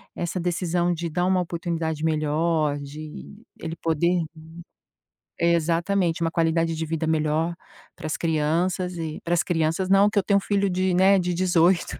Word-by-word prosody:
essa 175 +1 -3
decisão 175 0 0
de 170 0 -4
dar 175 +3 0
uma 185 0 +2
oportunidade 165 -2 -3
melhor, 155 -1 +1
de 155 +9 -9 0.2
ele 165 0 -5
poder 170 +2 +1 1.2
exatamente, 170 +1 +1
uma 165 0 0
qualidade 165 0 +1
de 160 0 -3
vida 160 0 -2
melhor 160 +1 +1 0.4
para - - -10
as 155 - -2
crianças 170 +3 0
e 160 -2 -4
para 170 - -1
as 170 - +3
crianças 165 +2 0
não, 195 +1 +5
que 205 - +1
eu 195 - -1
tenho 200 +1 +3
um - - +1
filho 200 0 0
de, 185 0 0
né, 190 +2 +5
de 180 -1 -1
18 180 0 +2
170 Hz, 165 wpm, -24 LUFS, 160-180 Hz, 1.2 s, não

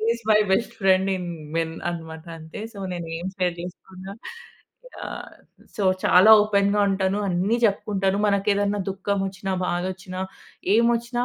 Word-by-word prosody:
Is 235 - -10
my 210 - +6
best 235 +4 0
friend 190 0 +3
in 180 -1 -5 0.3
men 165 0 -1 0.2
అనమాట. 160 -2 -7
అంటే 160 +4 -9
so 205 - -11
నేను 175 -2 -5
ఏం 175 - -5
షేర్ 180 -2 0
జేసుకున్నా 185 +2 -9 0.9
యాహ్! - - -7 0.4
సో 205 - -1 0.2
చాలా 185 +4 +7
ఓపెన్‌గా 205 0 +2
ఉంటాను. 190 +1 0
అన్ని 185 +5 +1
జెప్పుకుంటాను 200 -2 +1
మనకెదైనా 200 0 +1
దుఃఖం 200 +1 -2
వచ్చినా, 195 0 -4
బాధొచ్చినా, 185 +1 -3 0.5
ఏం 230 +2 +5
వచ్చినా 240 +1 -2
195 Hz, 140 wpm, -24 LUFS, 180-205 Hz, 0.9 s, చాలా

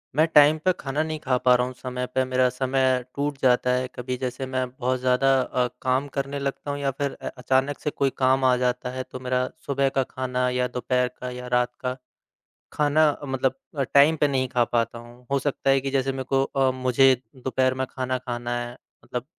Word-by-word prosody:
मैं 155 - +5
टाइम 150 +1 +7
पे 185 - +5
खाना 135 +2 -2
नहीं 155 -1 -4
खा 130 -4 0
पा 125 - +7
रहा 125 - +2
हूँ 130 - -7
समय 125 0 -4
पे, 130 +1 0
मेरा 130 0 +2
समय 130 0 +1
टूट 145 0 -2
जाता 125 0 +3
है, 125 0 0
कभी 125 +1 -4
जैसे 130 +1 -3
मैं 130 -1 -2
बहुत 130 0 -2
ज़्यादा 130 +1 +3
अ, 125 -1 0
काम 130 +2 +1
करने 140 +1 -2
लगता 140 +1 -3
हूँ 145 - -4
या 140 -1 0
फिर 140 +1 -2
अ, - - -5
अचानक 130 +3 0
से 150 - -2
कोई 140 -2 0
काम 130 0 +3
आ 130 -1 +5
जाता 125 0 -1
है, 130 0 -4
तो 130 - -9
मेरा 125 0 0 0.2
सुबह 140 -1 +1
का 135 - +4
खाना 125 -1 -1
या 125 0 0
दोपहर 125 0 0
का 125 - -5
या 125 0 -7
रात 125 0 +2
का। 125 -1 -2 0.8
खाना 150 +1 +3 0.2
मतलब 135 -1 0 0.2
अ, 140 - +2
टाइम 145 +3 +6
पे 150 - +5
नहीं 130 -2 0
खा 120 - +5
पाता 115 0 -1
हूँ, 120 +1 -15
हो 140 - +2
सकता 135 0 -1
है 135 0 +4
कि 135 0 -3
जैसे 135 0 0
मेरे 135 0 -4
को 135 0 +4
अ, 135 -1 +1
मुझे 130 +1 +4 0.2
दोपहर 130 0 0
में 130 0 -2
खाना 130 0 -2
खाना 120 -1 -4
है, 120 +1 -6 0.3
मतलब 125 0 -5
130 Hz, 220 wpm, -25 LUFS, 125-135 Hz, 0.8 s, टाइम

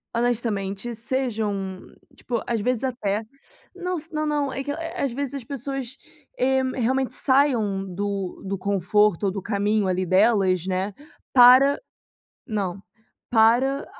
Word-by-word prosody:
honestamente 230 -2 -1
sejam 215 -6 -2 0.3
tipo, 235 -2 -3
às 235 -2 0
vezes 250 +2 0
até 225 -5 -1 0.5
não 365 0 -3
s 325 +1 -9
não 305 0 -1
não 295 -2 0
é 270 - -3
que, 285 - -3
eh, 330 +2 -5
às 275 - 0
vezes 280 0 -3
as 275 - -5
pessoas, 270 0 -5 0.4
eh, 265 0 +2 0.2
realmente 260 +2 +1
saiam 245 -8 +2
do 195 0 -4
do 195 +1 -2
conforto 200 +1 +1
ou 195 - +1
do 195 0 -5
caminho 205 0 0
ali 185 0 0
delas, 190 -2 +3
né, 190 +2 -1 0.4
para 260 +3 +7 0.7
não. 200 -5 -3 0.5
Para, 245 +5 +3
230 Hz, 135 wpm, -24 LUFS, 200-265 Hz, 0.7 s, para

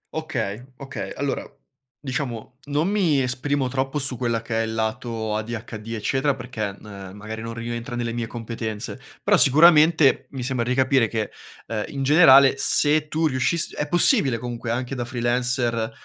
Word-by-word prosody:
Okay, 120 -8 -3
okay. 135 +1 -7
Allora, 140 -1 -2 0.6
diciamo, 125 -3 -5
non 150 +4 0
mi 175 -10 +2
esprimo 130 +2 -1
troppo 135 +2 -2
su 135 -2 +2
quella 115 -2 -2
che 115 -1 -1
è - - 0
il 110 - -5
lato 110 -1 -3
ADHD, 110 0 -6
eccetera, 135 +5 0
perché, 125 -4 -4
ehm, 100 -1 -10
magari 110 +2 -7
non 115 0 -6
rientra 120 +1 -5
nelle 120 -1 -3
mie 120 -1 -3
competenze, 115 -2 -6 0.2
però - - +4
sicuramente 155 -2 +5
mi 130 -3 -5
sembra 125 -2 -1
di 125 +1 0
capire 130 -2 +3
che, 110 -1 -3 0.3
ehm, 110 -2 -3
in 135 -1 -4
generale, 140 -2 +7
se 150 +2 +2
tu 160 +2 -1
riuscissi 155 +4 0
è 150 - -3
possibile 160 - +4
comunque 120 0 -6
anche 125 +3 -2
da 125 - -3
freelancer, 120 -1 -1
125 Hz, 160 wpm, -23 LUFS, 115-140 Hz, 0.6 s, generale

